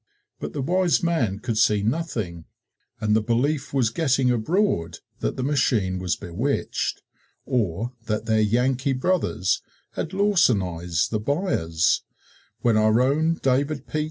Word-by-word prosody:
But - - -5
the 140 - -2
wise 180 +3 +2
man 130 - +1
could 110 0 -2
see 105 -2 +3
nothing 110 - -2 0.5
and 105 -1 +1
the 110 - +3
belief 130 +6 0
was 125 -5 +1
getting 135 -3 +2
abroad 115 - 0 0.2
that - - -2
the 130 - -2
machine 115 -9 +1
was 90 -4 -1
bewitched, 115 +12 -2 0.4
or 115 -2 -1
that 110 0 -1
their 110 -1 +2
Yankee 125 +5 +1
brothers 130 - 0 0.3
had 160 - -4
lawsonized 100 - +1
the 110 - 0
buyers, 105 - +1 0.6
when 115 -3 +3
our 110 +1 +4
own 155 +6 +2
David 140 +3 +1
P. 155 - -3
120 Hz, 135 wpm, -24 LUFS, 105-145 Hz, 0.6 s, our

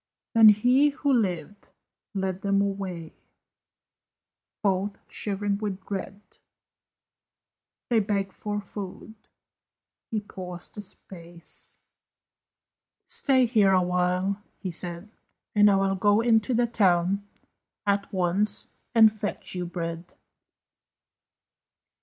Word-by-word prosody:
Then 225 -1 +9
he 250 +7 +4
who 285 -1 0
lived 200 - -1 0.5
led 190 -1 -2
them 200 0 +2
away, 195 -5 -3 1.5
Both 195 0 0
shivering 205 0 -2
with 200 -3 -4
dread; 200 0 -5 1.7
They 230 - +5
begged 200 -2 -1
for 210 -1 -4
food; 200 +2 -7 1.0
he 220 - -1
paused 180 -3 -9
a - - -3
space; 175 -3 -10 1.3
"Stay 260 -2 +3
here 215 -5 +4
awhile," 180 +2 +1 0.2
he 185 - -5
said, 175 +4 -5 0.4
"And 210 0 +6
I 200 - +4
will 195 0 +2
go 205 +2 +3
into 230 0 +3
the 240 +1 +3
town 195 -3 +2 0.6
At 200 0 0
once, 185 +3 0 0.3
and 220 -2 +7
fetch 210 -1 -5
you 180 -1 -3
bread." 170 0 -5
200 Hz, 100 wpm, -26 LUFS, 185-210 Hz, 1.7 s, Then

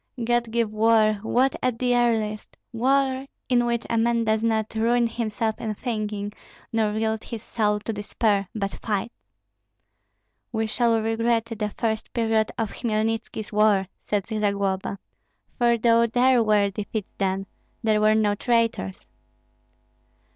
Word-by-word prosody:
"God 240 0 +1
give 225 -2 0
war, 215 -1 +3
war 255 +4 +3
at 250 -2 0
the 245 0 +1
earliest, 220 -3 0 0.2
war 265 +2 +1 0.2
in 240 -1 +3
which 235 0 -1
a 230 - +1
man 235 0 +2
does 220 0 +1
not 220 -1 0
ruin 235 +2 +2
himself 225 -1 -2
in 215 -2 -3
thinking, 210 -3 -3 0.4
nor 220 -2 +1
yield 220 0 -1
his 230 -2 -7
soul 210 -2 0
to 225 - -3
despair, 205 -1 0
but 200 -2 -2
fights." 215 +2 -2 1.4
"We 225 -1 0
shall 230 +1 +2
regret 225 +1 +1
the 220 -2 -3
first 220 -1 -2
period 225 -2 +1
of 225 -3 -2
Hmelnitski's 225 -1 -2
war," 205 -3 +3 0.2
said 205 -2 0
Zagloba; 200 -3 -1 0.6
"for 235 -1 +4
though 230 0 +4
there 245 +2 +4
were 210 -2 +3
defeats 210 +1 -5
then, 195 0 0 0.4
there 215 -1 +2
were 215 0 +4
no 210 -2 +2
traitors." 230 - 0
220 Hz, 140 wpm, -24 LUFS, 210-235 Hz, 1.4 s, for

